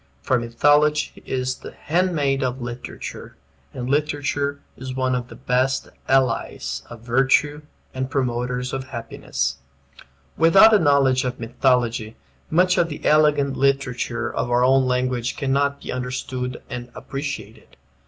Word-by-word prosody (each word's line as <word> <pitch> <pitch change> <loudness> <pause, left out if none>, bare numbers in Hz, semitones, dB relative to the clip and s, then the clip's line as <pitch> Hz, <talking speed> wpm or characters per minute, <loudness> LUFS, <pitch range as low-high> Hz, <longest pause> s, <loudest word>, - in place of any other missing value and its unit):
For 130 - +2
Mythology 145 +6 +2
is 130 0 -2
the - - -10
handmaid 150 -5 0
of 130 0 -1
literature; 120 - -7 0.3
and 125 -1 -5
literature 145 0 -1 0.2
is 130 0 -7
one 130 -1 0
of 125 -1 -2
the - - -11
best 130 +2 0 0.2
allies 115 - 0
of 120 -2 -10
virtue 135 +5 +2 0.3
and 130 0 -3
promoters 125 -1 -2
of 135 0 -3
happiness. 115 - -3 0.8
Without 190 +7 +7
a 210 - +6
knowledge 140 -4 +3
of 125 -1 -3
mythology 120 -2 0 0.3
much 180 +3 +3
of 170 - +2
the 150 - -7
elegant 150 -2 +3
literature 125 -3 0
of 120 - -2
our 120 +1 +3
own 130 0 +4
language 125 -1 -1
cannot 140 +1 0
be - - -5
understood 125 0 -4
and 120 0 -7
appreciated. 140 +1 -7
130 Hz, 135 wpm, -22 LUFS, 125-140 Hz, 0.8 s, Without